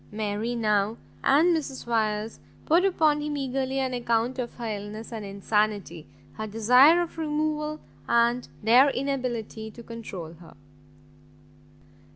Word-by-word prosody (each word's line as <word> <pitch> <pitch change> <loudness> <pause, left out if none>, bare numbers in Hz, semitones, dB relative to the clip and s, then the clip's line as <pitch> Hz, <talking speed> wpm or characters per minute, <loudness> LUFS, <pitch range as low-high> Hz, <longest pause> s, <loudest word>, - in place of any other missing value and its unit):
Mary 215 +2 -2
now, 210 -1 +1 0.3
and 330 +5 +4
Mrs 280 -4 -4
Wyers, 220 -2 -1 0.3
poured 340 +4 +4
upon 310 -6 +2
him 295 0 -3
eagerly 265 0 -2
an 260 -1 -1
account 240 +1 0
of 240 -1 -4
her 240 - -6
illness, 215 +1 -6
and 220 -2 -5
insanity, 200 -4 -1 0.3
her 215 0 -4
desire 250 +10 +5
of 330 -1 -8
removal, 305 0 -1 0.3
and 235 +1 +2 0.2
their 245 +6 +6
inability 250 -5 -3
to 235 +2 -12
control 205 -8 -8
her. 165 0 -16
235 Hz, 130 wpm, -26 LUFS, 215-275 Hz, 0.3 s, their